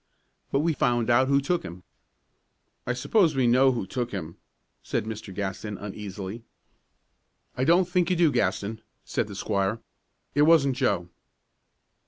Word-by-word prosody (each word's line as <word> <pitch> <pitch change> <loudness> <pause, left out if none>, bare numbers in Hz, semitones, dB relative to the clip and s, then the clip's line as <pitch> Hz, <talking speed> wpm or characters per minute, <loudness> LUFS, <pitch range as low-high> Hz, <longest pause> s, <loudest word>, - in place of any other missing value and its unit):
"But 140 - +2
we 165 +1 +1
found 120 -3 +1
out 130 +2 +4
who 140 0 +4
took 175 +5 0
him." 90 +2 -9 1.0
"I 125 - +1
suppose 165 - +2
we 130 -2 +2
know 130 +3 +5
who 120 -6 -3
took 120 +5 -3
him," 85 -4 -6 0.4
said - - -2
Mr. 110 -2 -6
Gaston, 100 +2 -4
uneasily. 105 +1 -7 1.1
"I 130 - 0
don't 175 +3 +4
think 180 -1 +1
you 185 - +2
do, 165 -3 +4
Gaston," 110 -1 -1 0.2
said 110 - -1
the 100 - -8
squire. 100 +2 -1 0.5
"It 145 - +2
wasn't 150 -4 +5
Joe." 90 -6 0
120 Hz, 150 wpm, -26 LUFS, 100-140 Hz, 1.1 s, know